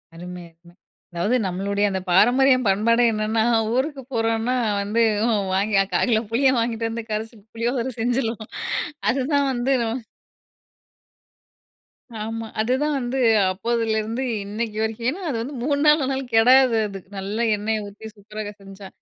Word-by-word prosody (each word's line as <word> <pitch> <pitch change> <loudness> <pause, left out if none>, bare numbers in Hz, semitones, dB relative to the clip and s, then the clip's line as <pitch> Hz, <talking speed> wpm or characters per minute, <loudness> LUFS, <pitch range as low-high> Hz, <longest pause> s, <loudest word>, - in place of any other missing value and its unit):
அருமை, 180 +1 -8
அருமை! 170 +1 -21 0.4
அதாவது 175 +8 0
நம்மளுடைய 200 +3 -1
அந்த 190 - -1
பாரம்பரியம், 255 +5 +4
பண்பாடே 230 +5 +3
என்னன்னா, 215 +1 0 0.3
ஊருக்கு 270 +2 -1
போறோம்ன்னா 225 +2 0 0.3
வந்து, 210 +3 0 0.5
வாங்கியா 195 0 +2
1/4 175 - +2
கிலோ 220 -1 +3
புளிய 260 +3 +3
வாங்கிட்டு 230 -1 -1
வந்து 230 0 -4
கரைச்சு, 220 +2 -4 0.2
புளியோதரை 240 +2 -1
செஞ்சுர்லாம். 230 -2 -1 0.6
அதுதான் 280 +2 +1
வந்து 250 +2 -1
நம்ம 225 +2 -2 2.3
ஆமா. 225 0 -5
அதுதான் 265 +6 0
வந்து 250 +2 -2 0.3
அப்போதிலேருந்து 225 +3 -1 0.2
இன்னைக்கு 215 +1 -4
வரைக்கும். 225 +2 -3
ஏன்னா, 365 +7 -5
அது 235 - -2
வந்து 270 +4 -6
3 285 0 +1
நாள் 300 0 +6
ஆனாலும் 265 -1 -2
கெடாது 250 +1 +6
அது. 195 -1 -7 0.2
நல்ல 195 +3 -4 0.2
எண்ணெய 215 +1 -2
ஊத்தி 215 +2 -10
சூப்பராக 210 0 -7
செஞ்சா. 195 0 -11
225 Hz, 135 wpm, -23 LUFS, 210-255 Hz, 2.3 s, நாள்